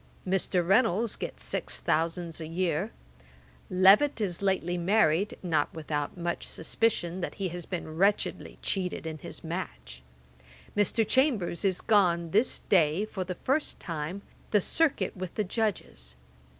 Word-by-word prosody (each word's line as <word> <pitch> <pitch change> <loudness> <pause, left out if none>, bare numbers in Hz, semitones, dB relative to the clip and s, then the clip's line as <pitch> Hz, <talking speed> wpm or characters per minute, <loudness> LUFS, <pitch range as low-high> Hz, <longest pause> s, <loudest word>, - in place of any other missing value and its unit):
Mr. 185 -2 +1
Reynolds 215 +1 +3
gets - - -5
six - - 0
thousands 165 +1 -1
a 160 - -5
year. 175 +3 -1 0.8
Levet 195 +11 +5
is 190 -5 -2
lately 190 -3 0
married, 190 0 +2
not 160 -5 +1
without 150 0 -3
much 175 0 -3
suspicion 180 -1 -1
that - - -4
he 195 -2 -2
has 175 0 -7
been 165 -4 -5
wretchedly 200 +3 +1
cheated 185 -4 -1
in 160 -1 -5
his - - -8
match. - - -6 0.7
Mr. 210 +2 +2
Chambers 225 - +1
is 190 -2 +1
gone 175 -6 +3
this 215 +7 +2
day, 170 +1 +3
for 195 -3 -4
the 180 0 -5
first 275 - -1
time, 170 +3 -5 0.3
the 210 - +4
circuit 315 - +1
with 185 -2 -6
the 215 - +1
Judges. 160 - -3
180 Hz, 140 wpm, -28 LUFS, 165-205 Hz, 0.8 s, Levet